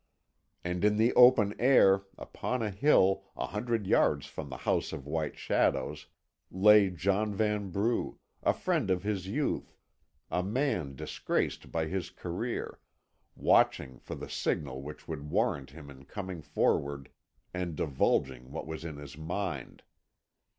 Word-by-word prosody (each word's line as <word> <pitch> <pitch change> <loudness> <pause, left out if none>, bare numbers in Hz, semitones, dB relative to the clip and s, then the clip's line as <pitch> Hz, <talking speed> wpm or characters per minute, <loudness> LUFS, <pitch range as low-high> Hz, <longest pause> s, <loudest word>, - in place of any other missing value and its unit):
And 90 +1 -2
in 105 0 +3
the 115 +3 +3
open 120 -5 +6
air, 100 -7 +5
upon 125 -2 -3
a 105 - -1
hill, 95 -4 +3
a - - -1
hundred 115 0 -2
yards - - +3
from - - -7
the - - -6
House - - 0
of 70 - -7
White 75 0 -3
Shadows, - - 0 0.4
lay 105 +1 +6
John 100 +4 0
Vanbrugh, 105 +1 0 0.2
a - - +3
friend - - -1
of 90 0 +1
his 100 -3 -2
youth, 140 +9 -2 0.5
a 90 - +1
man 95 - -1
disgraced - - -2
by 80 -1 0
his 90 +3 -3
career, 90 +8 -4 0.6
watching 65 -2 +2
for - - -7
the - - -7
signal 65 -3 -2
which 75 +2 -9
would 75 -2 -6
warrant 70 -2 0
him 70 0 -11
in 70 0 -14
coming 95 0 -6
forward 70 -2 0 0.4
and 90 -3 -3
divulging 65 -3 0
what 80 - -5
was 80 0 -6
in 80 -3 -6
his 70 -1 -9
mind. 85 -3 -4
90 Hz, 145 wpm, -30 LUFS, 75-105 Hz, 0.6 s, open